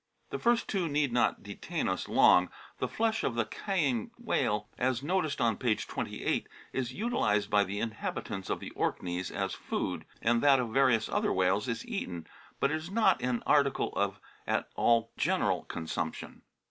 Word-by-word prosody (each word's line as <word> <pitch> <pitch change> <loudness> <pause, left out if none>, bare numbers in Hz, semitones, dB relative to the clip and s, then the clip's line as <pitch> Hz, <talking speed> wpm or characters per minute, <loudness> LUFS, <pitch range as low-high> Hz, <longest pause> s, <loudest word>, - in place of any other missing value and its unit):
The - - -3
first 240 0 +2
two 185 -5 0
need 145 -3 +1
not 120 - +2
detain - - -3
us - - -2
long. 90 0 +6 0.3
The - - 0
flesh 225 0 0
of 120 - 0
the 120 -1 +1
Caaing 145 - -1
whale, 105 0 0
as 130 0 +1
noticed 160 -2 0
on 115 -3 +2
page 115 -4 0
28, - - -2 0.3
is 130 -2 -2
utilised 200 - 0
by 105 -1 +5
the 100 +1 -4
inhabitants 110 -3 -4
of - - -1
the - - -7
Orkneys 90 0 -2
as - - -2
food, - - -3
and 115 0 +2
that 140 -2 +6
of 120 -2 -1
various 125 -5 +4
other - - 0
whales 95 +5 +2
is 115 -1 -3
eaten, 90 - -4 0.3
but 140 - +2
it 155 - +1
is 160 +2 -7
not 195 -3 +3
an 125 -1 -1
article 140 -2 +2
of 100 -1 0 0.3
at - - 0
all 115 -1 +3
general - - +1
consumption. 80 -2 -4
120 Hz, 170 wpm, -30 LUFS, 105-150 Hz, 0.3 s, long